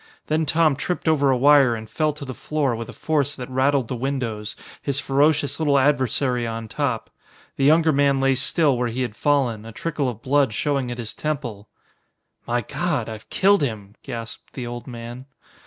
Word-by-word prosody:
Then 155 0 0
Tom 155 -1 +3
tripped 165 +5 -3
over 145 -3 +3
a 130 - +3
wire 140 -2 +6
and 110 -1 -7
fell 155 +6 0
to 150 -1 -8
the 130 - -5
floor 140 -2 -1
with 115 0 -6
a - - -5
force 145 -3 -1
that 125 0 -7
rattled 130 -1 +2
the 125 - -3
windows, 115 -5 -3 0.3
his 140 -1 -1
ferocious 145 +2 +2
little 145 -3 +3
adversary 130 -3 +1
on 115 0 -5
top. 125 -3 -2 0.4
The 135 - +1
younger 160 +2 +5
man 140 -1 +3
lay 135 0 +3
still 145 +2 +2
where 125 - +1
he 120 +2 -2
had 115 -4 -4
fallen, 130 -6 +1
a 115 - -9
trickle 145 +2 -2
of 115 -2 -8
blood 135 -4 +2
showing 140 -2 0
at 120 - -5
his 115 -3 -6
temple. 125 -10 -4 0.8
"My 120 +1 +1
God! 145 -1 -2
I've 110 -1 -9
killed 200 -1 +4
him!" 105 -7 -3
gasped 115 -3 -8
the 125 - -5
old 120 0 -7
man. 120 +1 -8
135 Hz, 190 wpm, -23 LUFS, 120-145 Hz, 0.8 s, wire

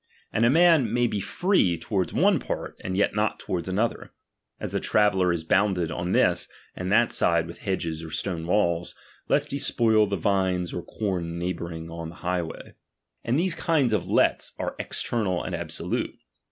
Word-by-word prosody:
And 110 - +2
a - - +5
man 160 -5 +5
may 120 +1 +2
be 105 -3 -1
free 100 - +1
toward 95 +2 -1
one - - +3
part, - - -5
and 95 0 -2
yet 100 - +2
not 105 +1 0
toward 85 -2 -3
another; 105 +5 -1 0.5
as - - -4
the - - 0
traveller 95 -4 +3
is 85 -2 -2
bounded 90 -1 +1
on 85 +1 -3
this - - +2 0.3
and 90 +1 -4
that 115 +3 +4
side 85 -1 +2
with 85 - -10
hedges 85 -5 -3
or 80 - -7
stone 80 +1 -3
walls, 85 -3 +1 0.3
lest - - +2
he 140 - -2
spoil 110 -5 +3
the 100 - -1
vines 95 -1 0
or 90 - -3
com 90 -4 -3
neigh 90 +2 -1
bouring 85 -1 -7
on 85 -1 -6
the 85 - -11
highway. 90 -2 -3 0.5
And 120 +3 +1
these 180 +1 +2
kinds 150 -8 +1
of 105 - -1
lets - - +2
are - - -3
external 100 -7 -1
and - - -5
absolute. - - -2
95 Hz, 180 wpm, -26 LUFS, 85-110 Hz, 0.5 s, a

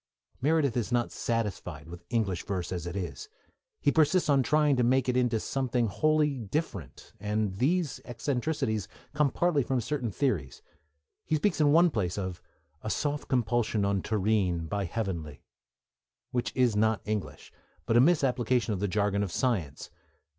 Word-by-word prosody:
Meredith 145 -3 +2
is 120 -1 -1
not 120 -1 +1
satisfied 95 -9 -3
with 85 +1 -10
English 105 -7 0
verse 95 -3 -3
as 90 -2 -3
it 85 - -5
is; 100 - -5 0.5
he - - +3
persists 160 +2 +3
in 140 -2 +5
trying 150 +1 +3
to 125 - +3
make 130 +2 +2
it 125 - +1
into 125 -3 +2
something 125 -1 0
wholly 150 +5 +1
different, 105 - -5
and 105 -1 -1
these 155 - 0
eccentricities 125 - -2 0.3
come 150 -1 +3
partly 170 0 +1
from 130 0 0
certain 125 0 -2
theories. 90 - -2 0.6
He 155 - 0
speaks 160 0 +1
in 145 -1 +5
one 170 +2 +5
place 95 -7 -1
of 95 -3 -4 0.4
A 110 - -4
soft 145 +4 -2
compulsion 120 -4 +1
on 100 -1 +1
terrene 100 -5 0
By 100 +2 -2
heavenly, 85 - -4 0.9
which 125 -1 -1
is 125 -4 +3
not 110 -2 +2
English, 105 -1 -4 0.3
but 115 - +1
a 120 - +7
misapplication 130 -7 +2
of 95 - -3
the 100 - 0
jargon 100 +1 +1
of 100 -3 -2
science. 90 - -2
115 Hz, 160 wpm, -29 LUFS, 100-140 Hz, 0.9 s, a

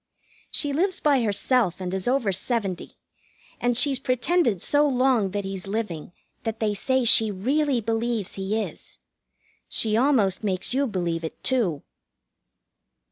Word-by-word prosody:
She 290 -2 -1
lives 370 +5 0
by 285 -4 +3
herself 215 -2 +1
and 185 -1 -4
is 190 +2 -2
over 245 -5 +1
seventy, 195 -1 -3 0.6
and 245 -1 +1
she's 275 -1 +2
pretended 255 - +1
so 295 0 +3
long 255 -6 +2
that 200 +1 -3
he's 195 -1 -6
living 195 -7 -4 0.3
that 225 -1 -4
they 215 -2 0
say 260 +5 0
she 220 -1 +6
really 260 +6 0
believes 225 -1 -2
he 195 +3 -2
is. - - -10 0.7
She 215 -1 +1
almost 225 -7 +2
makes 190 +1 -2
you 275 +1 +1
believe 175 -5 -2
it, 160 - -7
too. 210 - 0
225 Hz, 140 wpm, -25 LUFS, 195-260 Hz, 0.7 s, she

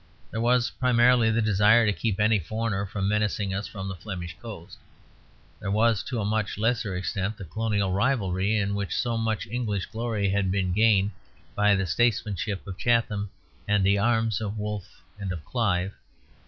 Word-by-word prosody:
There 115 - -2
was 120 +1 +2
primarily 125 -2 +4
the 110 0 +1
desire 105 +2 +5
to 105 - +2
keep 105 -1 -2
any 105 0 +4
foreigner 105 +2 -2
from 95 0 -2
menacing 105 -1 0
us 100 +2 -3
from 95 -2 -6
the 95 - -4
Flemish 90 -2 -6
coast; 105 -8 -9 0.8
there 100 - -4
was, 110 +1 +3
to 125 -3 -3
a 105 - -1
much 105 -1 -1
lesser 110 -3 0
extent, 100 +3 -2
the 100 - -8
colonial 105 +1 -1
rivalry 100 -2 +1
in 100 -1 0
which 100 -4 -2
so 120 -1 0
much 110 -1 -1
English 105 -4 -2
glory 110 -3 -2
had 100 -1 +1
been 95 -1 0
gained 105 -1 +3 0.4
by 105 0 +4
the 95 0 0
statesmanship 105 -1 0
of 95 -2 -8
Chatham 115 -4 +1 0.4
and 105 -1 +2
the 100 +1 +3
arms 115 -1 +1
of 105 0 -3
Wolfe 105 -2 -6 0.2
and 100 -2 -3
of 80 -5 -6
Clive. 100 -5 0
105 Hz, 175 wpm, -26 LUFS, 95-115 Hz, 0.8 s, desire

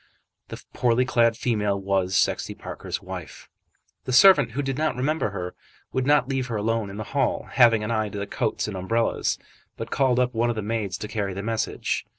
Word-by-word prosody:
The - - -8
poorly 125 +1 +2
clad 115 -3 +2
female 105 -5 0
was 95 -1 0
Sexty - - 0
Parker's - - -6
wife. - - -8 0.6
The 130 - -3
servant, 145 - +6
who 145 +3 -2
did 135 -1 -2
not 155 +1 0
remember 135 0 0
her, 90 -3 -5 0.4
would 130 0 0
not 145 -3 +4
leave 135 -2 -1
her 115 - -4
alone 110 0 -1
in 100 - -8
the 110 - -3
hall, 140 - 0
having 115 -4 +5
an 105 - -2
eye 110 -2 0
to 100 - -7
the 100 - -3
coats 100 - -2
and 105 - -5
umbrellas, 115 +5 0 0.4
but - - -6
called 130 -3 +2
up 125 0 +1
one 120 +1 +1
of 120 - -1
the 110 - -3
maids 105 -4 -2
to 105 - -6
carry 100 -3 -3
the 100 - -4
message. 115 0 -2
115 Hz, 205 wpm, -25 LUFS, 105-125 Hz, 0.6 s, servant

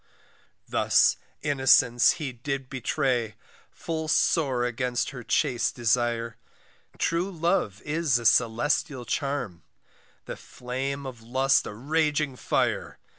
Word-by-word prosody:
Thus - - +3 0.3
innocence 130 -3 +4
he 155 -6 -5
did 135 +2 -5
betray, 130 -4 -1 0.3
Full 160 -1 -5
sore 135 -6 +2
against 125 +1 -2
her 125 -3 -8
chaste 120 +1 0
desire; 115 -1 0 0.6
True 170 +3 0
love 170 - -1
is 150 -4 +1
a 120 - -6
celestial 125 +4 +2
charm, 135 - -3 0.6
The - - -7
flame 135 +3 -5
of 125 -4 -8
lust 130 +4 +2
a - - -6
raging 150 +2 0
fire. - - -1
130 Hz, 110 wpm, -26 LUFS, 120-150 Hz, 0.6 s, innocence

